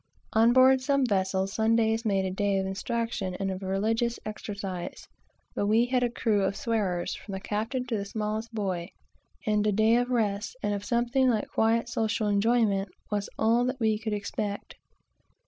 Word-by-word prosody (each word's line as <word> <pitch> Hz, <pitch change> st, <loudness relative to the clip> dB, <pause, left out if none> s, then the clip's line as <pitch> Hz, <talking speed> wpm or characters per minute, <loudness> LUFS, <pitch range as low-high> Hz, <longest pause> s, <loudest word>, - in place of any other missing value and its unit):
On 225 Hz, +2 st, +5 dB
board 260 Hz, +1 st, +6 dB
some 275 Hz, 0 st, +2 dB
vessels 190 Hz, -2 st, 0 dB
this 225 Hz, +1 st, +3 dB
is 225 Hz, 0 st, +1 dB
made 195 Hz, -2 st, +1 dB
a 190 Hz, -, -2 dB
day 200 Hz, +1 st, 0 dB
of 190 Hz, -, 0 dB
instruction 200 Hz, -1 st, -2 dB
and 195 Hz, -1 st, -1 dB
of 190 Hz, 0 st, -5 dB
religious 220 Hz, +5 st, 0 dB
exercises; 200 Hz, -4 st, -6 dB, 0.5 s
but 205 Hz, -, -1 dB
we 225 Hz, +3 st, +4 dB
had 250 Hz, 0 st, +1 dB
a 245 Hz, -, +2 dB
crew 220 Hz, -3 st, +1 dB
of 195 Hz, 0 st, 0 dB
swearers, 200 Hz, -7 st, -1 dB
from 200 Hz, -, -8 dB
the 190 Hz, -, -3 dB
captain 225 Hz, +6 st, -2 dB
to 235 Hz, -3 st, -2 dB
the 200 Hz, -, -3 dB
smallest 215 Hz, +2 st, -3 dB
boy; 190 Hz, -5 st, -3 dB, 0.6 s
and 210 Hz, -1 st, +2 dB
a -, -, +3 dB
day 220 Hz, +3 st, +4 dB
of 245 Hz, +1 st, 0 dB
rest, 215 Hz, -3 st, -1 dB
and 205 Hz, 0 st, 0 dB
of 200 Hz, 0 st, -3 dB
something 240 Hz, +4 st, +2 dB
like 220 Hz, -3 st, 0 dB
quiet, 230 Hz, +1 st, +2 dB
social 220 Hz, -2 st, -1 dB
enjoyment, 205 Hz, -1 st, +2 dB, 0.2 s
was 205 Hz, -1 st, -1 dB
all 230 Hz, +2 st, +3 dB
that 255 Hz, +1 st, -2 dB
we 220 Hz, -2 st, +1 dB
could 220 Hz, -1 st, -3 dB
expect. 205 Hz, 0 st, -4 dB
215 Hz, 180 wpm, -28 LUFS, 200-230 Hz, 0.6 s, board